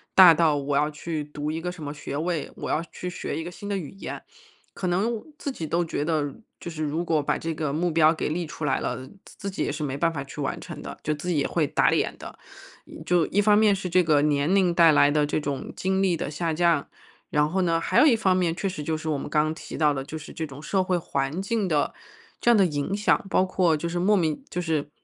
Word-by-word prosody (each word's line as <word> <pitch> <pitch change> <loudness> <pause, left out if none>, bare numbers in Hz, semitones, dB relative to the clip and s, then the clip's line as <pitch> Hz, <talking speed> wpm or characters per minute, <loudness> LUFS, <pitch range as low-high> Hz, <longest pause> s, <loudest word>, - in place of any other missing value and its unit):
大 180 -3 +10
到 160 -2 +3
我 140 0 -1
要 150 +1 +2
去 155 0 -4
读 150 +1 -4
一 165 +1 -4
个 180 +1 -3
什 170 -4 -10
么 145 0 -4
学 145 -1 -6
位， 165 -1 -2
我 - - -6
要 155 - +1
去 180 0 -5
学 - - -4
一 160 - -3
个 175 - -6
新 205 +3 -8
的 200 - 0
语 155 -7 -6
言。 195 - -7 0.5
可 185 - -3
能 215 +6 0 0.2
自 280 - -4
己 165 -10 -5
都 170 +2 +1
觉 155 -3 -2
得， 150 -3 0 0.2
就 170 - -7
是 155 -1 -6
如 160 +4 -1
果 160 -3 +1
把 - - 0
这 165 0 -3
个 150 -2 -2
目 170 +2 0
标 160 0 +5
给 160 - -2
立 170 +2 -2
出 155 - -8
来 145 - +1
了， 130 - -3 0.2
自 - - -15
自 200 - -4
己 - - -2
也 - - -1
是 155 - -4
没 135 -1 -3
办 165 +2 +2
法 135 -2 -4
去 140 - -10
完 140 - -2
成 - - -8
的， - - -8
就 155 - 0
自 150 +4 -7
己 170 -4 +1
也 140 - +1
会 155 -4 0
打 - - +3
脸 - - 0
的。 - - -10 0.7
就 175 -2 +3
一 205 - +2
方 210 0 +5
面 210 -2 +5
是 190 -1 -4
这 185 +1 +4
个 155 -4 +3
年 150 +3 +2
龄 180 -3 +3
带 165 -2 +6
来 145 0 +5
的 150 0 +2
这 150 +1 -1
种 140 -2 -4
精 190 +1 0
力 185 -3 +2
的 150 - -4
下 165 +1 -2
降， 170 -3 +2 0.4
然 150 0 +2
后 190 +2 0
呢， 165 -1 +1
还 - - +2
有 - - +7
一 255 -6 +6
方 190 -4 +2
面， 175 -2 +1
确 195 - -2
实 150 -5 -6
就 160 +2 -1
是 155 0 -5
我 150 - 0
们 - - -6
刚 155 +1 +1
提 - - -9
到 150 -2 +3
的， 135 -1 -4
就 160 +2 -6
是 155 - -10
这 160 -1 -4
种 140 +2 -11
社 190 -2 +1
会 185 -1 +1
环 140 +2 -2
境 205 -1 -1
的 150 -4 +1 0.5
这 240 - +2
样 235 - +6
的 195 - +5
影 150 +4 -1
响。 205 -1 +2
包 185 - +3
括 185 -3 +2
就 170 +3 -3
是 175 +1 -2
莫 205 +4 +4
名 160 -5 0
就 180 - -3
是 155 -3 -1
165 Hz, 290 characters per minute, -25 LUFS, 150-180 Hz, 0.7 s, 大